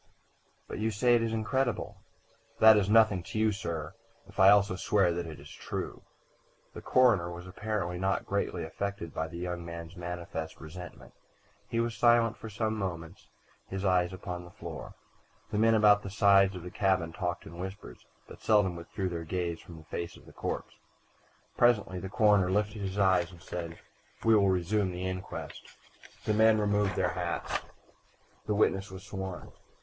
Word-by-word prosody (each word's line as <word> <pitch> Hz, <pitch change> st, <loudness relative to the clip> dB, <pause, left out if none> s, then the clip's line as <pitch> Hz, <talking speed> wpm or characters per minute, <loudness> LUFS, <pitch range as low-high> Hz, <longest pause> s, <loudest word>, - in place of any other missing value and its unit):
"But -, -, -6 dB
you 110 Hz, +1 st, +1 dB
say 115 Hz, +3 st, +3 dB
it 120 Hz, -, +4 dB
is 115 Hz, -1 st, -1 dB
incredible." 120 Hz, +2 st, -1 dB, 0.6 s
"That 110 Hz, 0 st, +8 dB
is 105 Hz, -1 st, +2 dB
nothing 110 Hz, -4 st, +5 dB
to 110 Hz, -, -7 dB
you, 110 Hz, 0 st, +3 dB
sir, 85 Hz, -7 st, -4 dB, 0.3 s
if -, -, -13 dB
I 95 Hz, 0 st, +8 dB
also 100 Hz, -2 st, +5 dB
swear 95 Hz, -1 st, +2 dB
that 85 Hz, 0 st, -3 dB
it 80 Hz, -, -8 dB
is 75 Hz, +1 st, -12 dB
true." -, -, -5 dB, 0.7 s
The -, -, -8 dB
coroner 115 Hz, -10 st, +4 dB
was 90 Hz, 0 st, -8 dB
apparently 90 Hz, -2 st, -3 dB
not 95 Hz, +1 st, 0 dB
greatly 100 Hz, -3 st, -1 dB
affected 90 Hz, 0 st, -4 dB
by 80 Hz, -, -2 dB
the 85 Hz, -, -9 dB
young 90 Hz, 0 st, -4 dB
man's 85 Hz, 0 st, -8 dB
manifest 85 Hz, -2 st, -6 dB
resentment. 90 Hz, +3 st, -10 dB, 0.6 s
He 115 Hz, -, -1 dB
was 115 Hz, 0 st, 0 dB
silent 115 Hz, +1 st, +4 dB
for 110 Hz, -, -9 dB
some 110 Hz, +1 st, -1 dB
moments, 85 Hz, -3 st, -5 dB, 0.4 s
his 95 Hz, +1 st, -4 dB
eyes 90 Hz, -1 st, +3 dB
upon 90 Hz, -1 st, -6 dB
the 85 Hz, -, -12 dB
floor. -, -, -8 dB, 0.6 s
The 105 Hz, -, 0 dB
men 115 Hz, +1 st, +5 dB
about 105 Hz, -1 st, +6 dB
the 100 Hz, -, -6 dB
sides 100 Hz, -2 st, +4 dB
of 90 Hz, -, -7 dB
the 90 Hz, -, -7 dB
cabin 95 Hz, -4 st, +1 dB
talked 90 Hz, -1 st, -3 dB
in 85 Hz, +2 st, -10 dB
whispers, 95 Hz, -8 st, -8 dB, 0.2 s
but -, -, -13 dB
seldom 105 Hz, -5 st, +3 dB
withdrew 95 Hz, +3 st, -4 dB
their 85 Hz, -2 st, -4 dB
gaze 85 Hz, 0 st, -2 dB
from 85 Hz, -, -12 dB
the 80 Hz, -, -12 dB
face 85 Hz, +2 st, -5 dB
of -, -, -18 dB
the -, -, -15 dB
corpse. -, -, -4 dB, 0.8 s
Presently 105 Hz, -6 st, +3 dB
the 95 Hz, -, -6 dB
coroner 105 Hz, -3 st, +4 dB
lifted 105 Hz, +2 st, 0 dB
his 95 Hz, 0 st, -4 dB
eyes 95 Hz, -3 st, +3 dB
and 85 Hz, -, -14 dB
said: 85 Hz, -3 st, -6 dB, 0.5 s
"We 115 Hz, -, +6 dB
will 100 Hz, -2 st, +5 dB
resume 95 Hz, +2 st, +1 dB
the 90 Hz, +1 st, -4 dB
inquest." 95 Hz, 0 st, -6 dB, 0.5 s
The 110 Hz, -, +2 dB
men 110 Hz, +1 st, +5 dB
removed 105 Hz, -1 st, +1 dB
their -, -, +1 dB
hats. -, -, -2 dB, 0.9 s
The 105 Hz, -, +1 dB
witness 100 Hz, -1 st, +2 dB
was 95 Hz, 0 st, -9 dB
sworn. 95 Hz, -2 st, -6 dB
95 Hz, 175 wpm, -30 LUFS, 90-105 Hz, 0.9 s, That